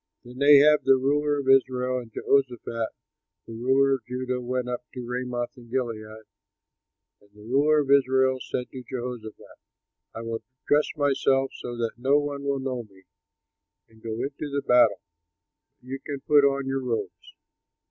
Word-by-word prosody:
Then 125 Hz, +2 st, -11 dB
Ahab, 145 Hz, +1 st, +7 dB
the 135 Hz, -, +5 dB
ruler 145 Hz, +2 st, +1 dB
of 140 Hz, -2 st, -4 dB
Israel, 130 Hz, -1 st, +3 dB
and 120 Hz, -2 st, -11 dB
Jehoshaphat, 120 Hz, -3 st, 0 dB, 0.6 s
the 115 Hz, -, -10 dB
ruler 135 Hz, +4 st, +2 dB
of 130 Hz, -, -3 dB
Judah, 125 Hz, 0 st, -3 dB
went 125 Hz, 0 st, -2 dB
up 125 Hz, 0 st, -4 dB
to 125 Hz, -1 st, -6 dB
Ramoth 125 Hz, +1 st, -4 dB
in 120 Hz, -2 st, -15 dB
Gilead. 110 Hz, -3 st, -4 dB, 1.0 s
And 100 Hz, -, -25 dB
the 105 Hz, -, -16 dB
ruler 145 Hz, +6 st, +3 dB
of 140 Hz, -1 st, -2 dB
Israel 130 Hz, -1 st, +3 dB
said 125 Hz, +1 st, -4 dB
to 130 Hz, -, -7 dB
Jehoshaphat, 120 Hz, -3 st, -8 dB, 0.6 s
"I 115 Hz, -, -6 dB
will 115 Hz, 0 st, -4 dB, 0.2 s
dress 150 Hz, +1 st, +3 dB
myself 135 Hz, -2 st, +1 dB
so 120 Hz, -1 st, -7 dB
that 115 Hz, 0 st, -3 dB
no 135 Hz, +3 st, +3 dB
one 145 Hz, -1 st, -2 dB
will 140 Hz, 0 st, -1 dB
know 130 Hz, -2 st, -3 dB
me, 100 Hz, -4 st, -18 dB, 0.9 s
and 110 Hz, 0 st, -22 dB
go 115 Hz, -1 st, -5 dB
into 145 Hz, +2 st, -5 dB
the 140 Hz, 0 st, -2 dB
battle, 120 Hz, -4 st, +4 dB, 0.8 s
but 125 Hz, -, -21 dB
you 135 Hz, +1 st, -4 dB
can 145 Hz, -2 st, -5 dB
put 145 Hz, 0 st, +4 dB
on 140 Hz, -1 st, +1 dB
your 135 Hz, 0 st, -2 dB
robes." 115 Hz, -7 st, -5 dB
130 Hz, 165 wpm, -25 LUFS, 120-140 Hz, 1.0 s, Ahab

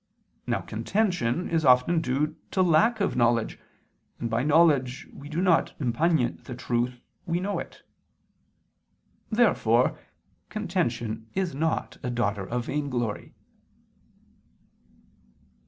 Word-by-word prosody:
Now -, -, 0 dB
contention 180 Hz, -, -1 dB
is 165 Hz, -1 st, 0 dB
often 130 Hz, +6 st, +4 dB
due 150 Hz, +2 st, -1 dB
to 190 Hz, -, +2 dB
lack 215 Hz, +7 st, +3 dB
of 195 Hz, -, 0 dB
knowledge, 120 Hz, -2 st, +1 dB, 0.6 s
and 115 Hz, -, -3 dB
by 115 Hz, +1 st, +1 dB
knowledge 145 Hz, -4 st, +3 dB
we 145 Hz, +1 st, -10 dB
do 165 Hz, +4 st, -1 dB
not 175 Hz, -4 st, +2 dB
impugn 145 Hz, +1 st, +1 dB
the 125 Hz, -, -6 dB
truth, 125 Hz, 0 st, -1 dB, 0.3 s
we 170 Hz, +1 st, 0 dB
know 200 Hz, +2 st, -2 dB
it. -, -, -9 dB, 1.5 s
Therefore 235 Hz, +2 st, +3 dB, 0.5 s
contention 120 Hz, -, -2 dB
is 190 Hz, -2 st, -1 dB
not 160 Hz, +4 st, -2 dB
a 125 Hz, -, -3 dB
daughter 100 Hz, -5 st, -1 dB
of 120 Hz, 0 st, -2 dB
vainglory. 125 Hz, -7 st, -3 dB
145 Hz, 110 wpm, -26 LUFS, 120-170 Hz, 1.5 s, often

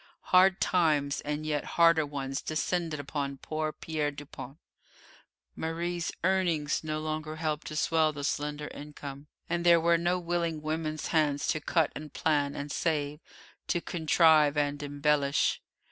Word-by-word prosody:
Hard 185 Hz, +1 st, +6 dB
times 150 Hz, -6 st, +2 dB
and 150 Hz, +1 st, -3 dB
yet 150 Hz, -2 st, -1 dB
harder 165 Hz, -2 st, +5 dB
ones 135 Hz, -1 st, -4 dB
descended 160 Hz, 0 st, -2 dB
upon 140 Hz, -1 st, -3 dB
poor 155 Hz, +2 st, -3 dB
Pierre 155 Hz, -1 st, -2 dB
Dupont. 145 Hz, -1 st, -9 dB, 1.0 s
Marie's 170 Hz, +1 st, -2 dB
earnings 175 Hz, -6 st, +1 dB
no 155 Hz, -1 st, -2 dB
longer 155 Hz, 0 st, -4 dB
helped 155 Hz, -1 st, -2 dB
to 155 Hz, -, -6 dB
swell 160 Hz, 0 st, +2 dB
the 145 Hz, -1 st, -7 dB
slender 150 Hz, +1 st, -2 dB
income, 145 Hz, -1 st, -9 dB, 0.2 s
and 170 Hz, 0 st, -1 dB
there 170 Hz, -1 st, +6 dB
were 170 Hz, +1 st, +3 dB
no 175 Hz, +2 st, +1 dB
willing 170 Hz, -2 st, -1 dB
woman's 155 Hz, 0 st, -3 dB
hands 150 Hz, -3 st, +1 dB
to 155 Hz, -, 0 dB
cut 160 Hz, 0 st, +1 dB
and 150 Hz, -1 st, -8 dB
plan 145 Hz, -3 st, +1 dB
and 145 Hz, +1 st, -5 dB
save, 150 Hz, -3 st, -1 dB, 0.5 s
to 175 Hz, -, +1 dB
contrive 160 Hz, -3 st, +4 dB
and 145 Hz, 0 st, 0 dB
embellish. 145 Hz, 0 st, +1 dB
155 Hz, 145 wpm, -29 LUFS, 145-165 Hz, 1.0 s, Hard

